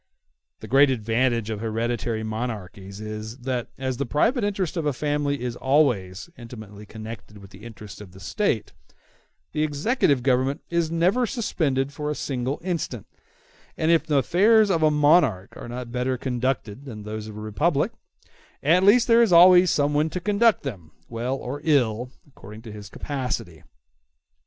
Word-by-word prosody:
The - - -8
great 140 +2 +5
advantage 115 -1 0
of 105 - -4
hereditary 115 0 -2
monarchies 105 -3 -6
is, 110 +2 -6
that 125 -1 -3
as 130 -2 -3
the 140 - -2
private 230 - +1
interest 195 -4 -1
of 165 -3 -1
a 145 - +1
family 145 +1 -1
is 120 -1 -3
always 125 - +1
intimately 110 -3 -11
connected 110 -1 -9
with 100 -1 -14
the 100 +2 -14
interests 105 -3 -10
of 100 -3 -11
the 95 - -14
State, 110 - -2 0.8
the 155 - -2
executive 150 - +1
government 130 +2 +1
is 170 -2 +1
never 185 +9 +2
suspended 140 - -1
for 150 0 -4
a 150 - -2
single 135 -1 -3
instant; 165 - -3 0.7
and 160 +1 +2
if 165 - +2
the 150 -3 +2
affairs 205 - +4
of 165 -3 +1
a 155 - +5
monarchy 150 - +3
are - - -9
not 120 0 -6
better 125 +1 -1
conducted 125 -1 -3
than 110 -6 -8
those 105 0 -6
of 105 -1 -9
a - - -6
republic, 105 -3 0 0.7
at 170 +5 +4
least 225 +5 +5
there 230 0 +6
is 230 -5 +3
always 180 +1 +7
some 145 -1 +1
one 150 +2 +1
to 180 - -4
conduct 210 +3 +2
them, 100 - -7 0.2
well 120 +3 -2
or 135 +2 -6
ill, 125 -6 +1 0.2
according 110 -5 -13
to 110 - -9
his 105 -1 -10
capacity. 125 - -4
130 Hz, 165 wpm, -24 LUFS, 110-155 Hz, 0.8 s, always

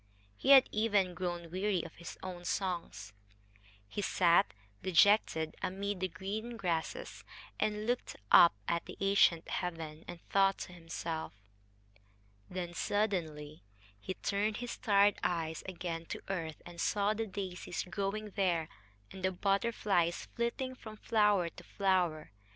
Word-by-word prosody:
He 265 - -2
had 270 -2 +9
even 205 -4 +2
grown 175 -1 -4
weary 190 -1 0
of 165 - -9
his 170 - -8
own 180 -2 -6
songs. 170 - -3 0.7
He 205 - -4
sat, 170 - +4 0.3
dejected, 180 -3 +4
amid 195 +1 -2
the 185 - 0
green 205 +7 -5
grasses, 180 - -3 0.4
and 210 0 0
looked 245 +2 -1 0.2
up 170 - +8
at 170 0 0
the - - -9
ancient 195 -4 +4
heaven 165 -3 -4
and 175 -1 -7
thought 195 0 +4
to 180 - -7
himself. 165 - -5 1.1
Then 180 -1 -4
suddenly 165 -7 -1 0.4
he 185 - -5
turned 205 +1 -1
his 245 0 -4
tired 205 -2 +3
eyes 160 -2 -1
again 170 -3 -4
to - - -6
earth, 165 -5 -4
and 175 -1 -7
saw 205 0 +2
the 225 +1 -3
daisies 185 -3 -4
growing 200 +2 -3
there, 175 -6 0 0.4
and 190 - -9
the 185 - +2
butterflies 195 -3 +1
flitting 235 +2 -1
from 220 -4 -10
flower 210 -5 +3
to - - -13
flower. 180 - 0
185 Hz, 135 wpm, -33 LUFS, 170-205 Hz, 1.1 s, had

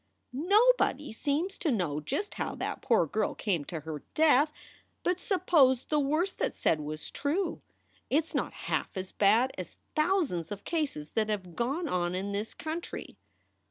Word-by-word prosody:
"Nobody 360 - +3
seems 310 - -1
to 365 -7 0
know 170 - 0
just 390 - -3
how - - -3
that - - -4
poor 230 -9 +3
girl 210 +7 -1
came 180 -8 0
to 160 0 -5
her 150 -1 -6
death. 300 -1 +5 0.5
But 360 0 +1
suppose 300 - +4
the 300 - +1
worst 310 +7 0
that - - 0
s - - -16
said 160 - +2
was 155 +1 -6
true. 330 +7 -1 0.5
It 300 +5 +3
s 325 - -15
not - - 0
half - - -1
as 185 0 -4
bad 225 +6 +4
as 180 - -7 0.2
thousands 305 - +1
of 205 -1 -5
cases 285 - -2
that 220 -1 0
have 185 -5 -3
gone 280 +8 -1
on 175 -5 0
in 195 +2 -2
this 205 +2 -3
country. 315 - -6
260 Hz, 170 wpm, -30 LUFS, -, 0.5 s, death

